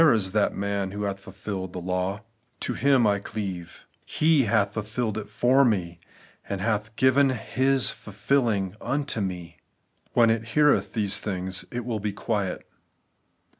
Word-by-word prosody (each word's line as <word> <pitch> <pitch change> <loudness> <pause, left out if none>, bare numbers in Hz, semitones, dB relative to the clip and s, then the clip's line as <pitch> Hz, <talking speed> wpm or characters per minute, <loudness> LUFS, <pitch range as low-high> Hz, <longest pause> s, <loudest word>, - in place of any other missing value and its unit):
It 155 -7 +7
is 95 -4 0
that 105 0 +1
man 100 -1 -1
who 100 +2 -5
hath 100 -1 -2
fulfilled 95 -1 -6
the 90 - -4
law; 90 +3 -2 0.4
to - - -1
Him 135 -3 +3
I 100 -1 +3
cleave; 95 -5 -6 0.2
He 155 -4 +3
hath 100 -2 +2
fulfilled 110 +1 -2
it 110 -1 -5
for 125 +5 +4
me, 90 -8 0 0.5
and 100 - -2
hath 105 +1 -1
given 130 +3 +4
His 130 +1 +1
fulfilling 105 -2 0
unto 140 -5 -2
me. 90 -3 -5 0.6
When 115 -2 +5
it 115 0 0
heareth 150 -1 +4
these 105 -4 0
things, 95 -2 -3
it 120 -1 -4
will 115 -3 -2
be 105 0 -3
quiet. 100 -3 -2
105 Hz, 155 wpm, -26 LUFS, 95-120 Hz, 0.6 s, It